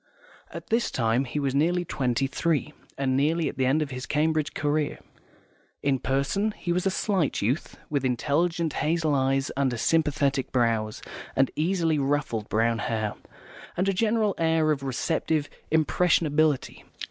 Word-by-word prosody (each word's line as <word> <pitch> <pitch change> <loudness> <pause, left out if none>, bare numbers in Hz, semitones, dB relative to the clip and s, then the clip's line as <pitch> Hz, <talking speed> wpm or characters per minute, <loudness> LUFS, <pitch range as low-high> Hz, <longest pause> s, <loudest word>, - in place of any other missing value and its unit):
At - - -9
this 235 +1 +2
time 120 +2 +1
he 130 - -5
was 135 -2 -1
nearly 175 +5 +2
twenty 130 -3 0
three, 150 +2 -1 0.2
and 135 -1 0
nearly 155 +4 +2
at - - -5
the 130 -1 +2
end 150 +4 +2
of 140 - -7
his 130 0 -6
Cambridge 155 0 0
career. 145 0 0 0.9
In 135 -2 +2
person 140 - 0
he 175 - -3
was 180 +2 0
a - - +4
slight 190 - 0
youth, 125 +10 -1
with 145 -3 -1
intelligent 155 +6 0
hazel 160 -1 0
eyes 135 0 +1
under 135 -3 0
sympathetic 140 -2 +1
brows, 115 -3 0 0.3
and 135 0 +3
easily 165 -1 +1
ruffled 135 -6 -1
brown 115 +1 +1
hair, 110 -4 -1 0.6
and 185 +2 +1
a 195 - +2
general 215 +1 +1
air 160 -1 +2
of 145 -2 -1
receptive 145 +3 -1 0.2
impressionability. 155 -2 +2
145 Hz, 150 wpm, -26 LUFS, 135-165 Hz, 0.9 s, a